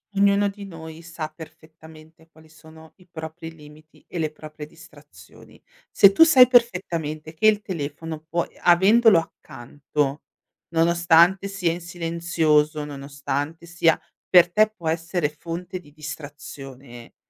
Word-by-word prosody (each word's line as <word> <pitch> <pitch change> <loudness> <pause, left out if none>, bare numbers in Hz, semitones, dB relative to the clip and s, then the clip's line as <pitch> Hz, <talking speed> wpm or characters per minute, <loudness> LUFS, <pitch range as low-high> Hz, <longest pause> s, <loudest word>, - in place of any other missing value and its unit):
Ognuno 200 +1 +3
di 200 0 -8
noi 160 -3 -10
sa 170 -2 -6
perfettamente 160 0 -16
quali 160 -1 -20
sono 160 0 -17
i 185 - -22
propri 160 0 -8
limiti 155 0 -18
e 175 - -6
le 155 -2 -1
proprie 155 -1 -11
distrazioni. 165 +2 -18 0.3
Se 200 - +6
tu 260 - 0
sai 265 -6 +8
perfettamente 170 - 0
che 190 +7 +2
il 210 -1 +3
telefono 160 -2 -6
puoi 170 +1 -4
avendolo 200 +4 +5
accanto, 145 -1 -4 0.5
nonostante 170 +3 +3
sia 190 -4 -1
in 175 - -6
silenzioso, 165 -3 0
nonostante 145 +3 -5
sia 170 -1 +1 0.3
per 175 -1 +6
te 215 +3 +3
può 175 -7 -9
essere 165 0 -1
fonte 170 +4 -7
di 150 -5 -19
distrazione, 140 -5 -10
165 Hz, 130 wpm, -23 LUFS, 155-175 Hz, 0.5 s, sai